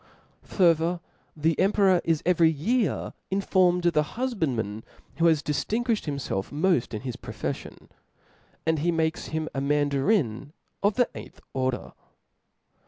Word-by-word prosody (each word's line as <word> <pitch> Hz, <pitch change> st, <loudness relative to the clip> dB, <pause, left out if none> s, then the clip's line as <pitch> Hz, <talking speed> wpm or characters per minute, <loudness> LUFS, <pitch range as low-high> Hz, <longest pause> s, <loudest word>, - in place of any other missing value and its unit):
Farther, 170 Hz, -1 st, +2 dB, 0.4 s
the 160 Hz, +2 st, +1 dB
emperor 190 Hz, -2 st, +4 dB
is 165 Hz, -2 st, 0 dB
every 170 Hz, -2 st, +4 dB
year 210 Hz, -, 0 dB, 0.2 s
informed 185 Hz, -2 st, +2 dB
of 175 Hz, -, +3 dB
the 150 Hz, -, +4 dB, 0.2 s
hufbandman, 135 Hz, -, -1 dB, 0.4 s
who 165 Hz, +1 st, +4 dB
has 160 Hz, -3 st, +3 dB
diflingui(hed 220 Hz, -, -1 dB
himfelf 135 Hz, -9 st, -3 dB
mod: 155 Hz, -3 st, +1 dB
in 105 Hz, -, -4 dB
his 125 Hz, -3 st, -5 dB
profeflion; -, -, -6 dB, 0.8 s
and 160 Hz, -1 st, +1 dB
he 170 Hz, +4 st, +1 dB
makes 160 Hz, 0 st, -1 dB
him 160 Hz, 0 st, -3 dB
a 135 Hz, -, -2 dB
Mandarin 145 Hz, -, +1 dB, 0.3 s
of 205 Hz, +1 st, +2 dB
the 245 Hz, -1 st, +3 dB
eighth -, -, -10 dB
order. 130 Hz, -1 st, -2 dB
160 Hz, 130 wpm, -26 LUFS, 145-190 Hz, 0.8 s, emperor